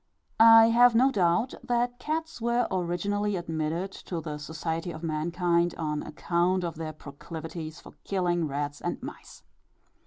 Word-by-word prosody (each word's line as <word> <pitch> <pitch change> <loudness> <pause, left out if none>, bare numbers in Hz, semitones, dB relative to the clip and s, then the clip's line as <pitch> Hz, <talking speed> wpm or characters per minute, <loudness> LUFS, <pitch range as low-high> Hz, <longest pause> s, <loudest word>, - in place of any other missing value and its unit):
I 225 0 +9
have 240 0 +6
no 260 +4 +5
doubt 200 +4 +1
that 245 0 0
cats 320 -1 -3
were 235 +1 +1
originally 200 +3 -1
admitted 165 +2 -2 0.2
to 175 - -2
the 150 -2 -6
society 160 +2 -4
of 160 0 -9
mankind, 170 +2 0
on 150 -2 -2
account 180 +3 0
of 170 -1 -2
their 160 -1 -4
proclivities 155 +2 -8
for - - -14
killing 175 -4 0
rats 145 +1 -4
and - - -2
mice. - - -10
175 Hz, 145 wpm, -28 LUFS, 160-225 Hz, 0.2 s, I